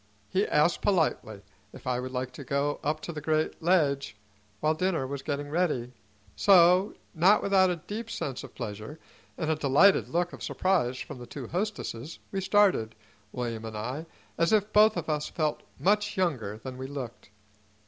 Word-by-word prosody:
He 195 +3 +1
asked 150 +3 +2
politely 155 - 0 0.3
if - - -13
I 125 -1 0
would 130 +1 -5
like 130 0 -3
to 140 - -8
go 140 +2 -1
up 155 +2 -1
to 170 - -6
the 150 - -6
great 155 +1 0
ledge 150 - +2 0.4
while 155 +1 +2
dinner 165 -4 0
was 140 +1 -5
getting 145 0 -3
ready; 150 -8 0 0.4
so, 185 +1 +5 0.2
not 185 +6 +4
without 190 -2 +4
a 180 - 0
deep 215 +7 -7
sense 135 - -4
of 135 - -11
pleasure, 110 +8 -6 0.4
and 160 -2 -1
a - - +2
delighted 155 +7 +4
look 175 +1 0
of - - -10
surprise 170 -10 0
from 145 -1 -7
the 120 - -9
two 130 -3 -7
hostesses, 170 - -4
we 195 - -2
started, 190 - +3 0.4
William 115 -3 -4
and 110 -1 -6
I, 130 +9 -4 0.3
as 170 +3 +3
if 215 0 +2
both 215 +1 +6
of - - -3
us 150 -1 -1
felt 155 -2 -1 0.2
much 205 +1 +1
younger 130 - -1
than 130 +2 -8
we 130 - -5
looked. 135 -7 -7
155 Hz, 180 wpm, -28 LUFS, 130-185 Hz, 0.4 s, both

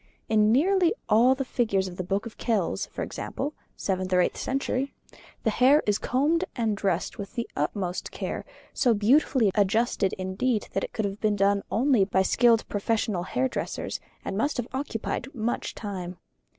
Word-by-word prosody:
In 215 -1 +4
nearly 360 - +3
all 235 +5 +5
the 270 0 -3
figures 215 -7 0
of 180 -1 -8
the 185 - -2
Book 195 +4 -1
of 230 - -9
Kells, 220 -7 0
for - - -5
example 290 +3 -4 0.2
(seventh 185 -1 -2
or 180 - +4
eighth - - 0
century), 270 0 -2 0.5
the 220 - +2
hair 265 +7 +5
is 210 -1 +1
combed 300 +7 +1
and 225 -4 0
dressed 190 -2 -1
with 200 -1 -7
the 235 - -2
utmost 185 -3 -2
care, - - -4 0.3
so 240 -4 +3
beautifully 230 0 +3
adjusted 205 -1 +2
indeed 195 +5 -1
that 195 - 0
it - - -4
could 220 - -2
have 200 +1 -4
been 215 -1 +2
done 200 0 +3
only 245 -1 +3
by 190 -1 +2
skilled 230 +2 +3
professional 210 -2 0
hairdressers, 255 +8 -2 0.3
and - - -3
must 280 +8 0
have 245 -1 -2
occupied 260 -2 -3
much 235 0 -2
time. 185 -4 -5
220 Hz, 170 wpm, -27 LUFS, 195-255 Hz, 0.5 s, all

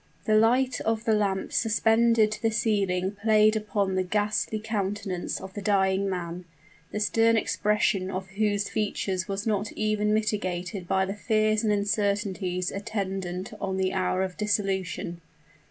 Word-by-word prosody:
The 215 - +2
light 250 +4 +3
of 225 0 -1
the 225 - +3
lamp 200 -2 0
suspended 225 0 +3
to 215 - -5
the 225 - +2
ceiling 200 -3 0
played 215 0 +4
upon 205 -2 -1
the 185 - +1
ghastly 210 +3 0
countenance 205 -4 -3
of 190 0 -9
the 205 - -5
dying 195 -1 +2
man, 175 -1 -4 0.5
the 210 - -3
stern 225 +2 +3
expression 210 -3 +1
of 190 0 -5
whose 205 0 0
features 195 -3 -2
was 195 0 -3
not 210 -1 0
even 215 -1 0
mitigated 185 -4 -1
by 190 +1 +2
the 195 - -3
fears 215 0 +1
and 215 - +2
uncertainties 200 -3 0
attendant 195 -3 -4
on 190 -1 -2
the 190 0 0
hour 185 0 0
of 185 -1 -5
dissolution. 195 -4 -2
205 Hz, 150 wpm, -27 LUFS, 190-215 Hz, 0.5 s, played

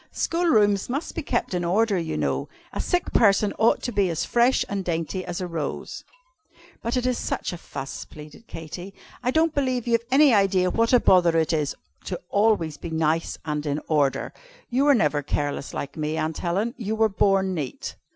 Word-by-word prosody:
School 340 +1 -1
rooms 205 - +3
must 280 +6 -3
be 335 - -3
kept 240 -8 -2
in 175 -1 -1
order, 205 +5 +2
you 165 -3 -2
know. - - -1 0.2
A - - -2
sick 355 -1 -1
person 205 -2 +4
ought 225 +1 +3
to 245 - -2
be 200 -4 +1
as 165 -1 -1
fresh 240 +2 +3
and 200 -1 -3
dainty 170 +2 -2
as 175 -1 -5
a 185 - -3
rose." 165 -5 -5 0.8
"But 235 +2 -1
it 250 - -1
is 250 -1 0
such - - -3
a - - -5
fuss," 135 -4 -7
pleaded 150 +8 -13
Katy. 175 +4 -8 0.3
"I 250 - 0
don't 320 +3 +2
believe 255 -4 0
you've 230 -1 +2
any 275 0 +6
idea 195 -3 +3
what 230 +3 +1
a 250 - +6
bother 175 -6 +4
it 160 0 +1
is 150 -3 0 0.3
to 180 - -4
always 200 -8 +2
be 170 - -7
nice 160 0 0
and 150 -1 -2
in 145 +1 -1
order. 145 -4 +1 0.4
You 275 +4 +4
never 150 - +2
were - - -3
careless 145 0 -3
like 140 - -5
me, 155 0 -2
Cousin 160 0 -1
Helen; 195 +7 -1
you 220 -1 -2
were 220 0 +4
born 195 -1 +2
neat." 145 -7 -5
190 Hz, 200 wpm, -24 LUFS, 160-230 Hz, 0.8 s, any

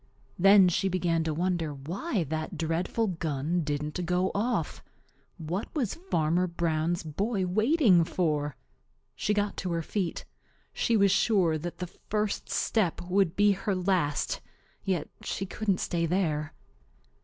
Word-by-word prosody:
Then 195 +1 +7
she 185 +2 +1
began 170 -3 +1
to 160 - 0
wonder 170 -3 -1
why 185 - -2
that 155 +1 -4
dreadful 165 +7 0
gun 165 -2 -1
didn't 150 +3 -2
go 180 +2 +1
off. 205 -6 -1 0.5
What 170 +6 -3
was 250 -10 0 0.2
Farmer 165 +3 +2
Brown's 170 0 -1
boy 195 +6 -1
waiting 215 - +4
for? 150 -5 -1 0.6
She - - -1
got 205 0 -1
to 180 - -3
her 165 -1 -1
feet. 185 0 -3 0.5
She 230 -2 +2
was 200 -1 +4
sure 190 -5 +3
that 175 +3 -6
the 180 - -3
first 210 +3 -3
step 205 -7 +1
would 180 -1 +1
be 205 0 +5
her 195 +1 -1
last, 180 -6 0 0.4
yet 185 -6 -1
she 195 - -3
couldn't 200 0 -1
stay 170 -1 0
there. 155 -4 -1
180 Hz, 140 wpm, -28 LUFS, 160-195 Hz, 0.6 s, Then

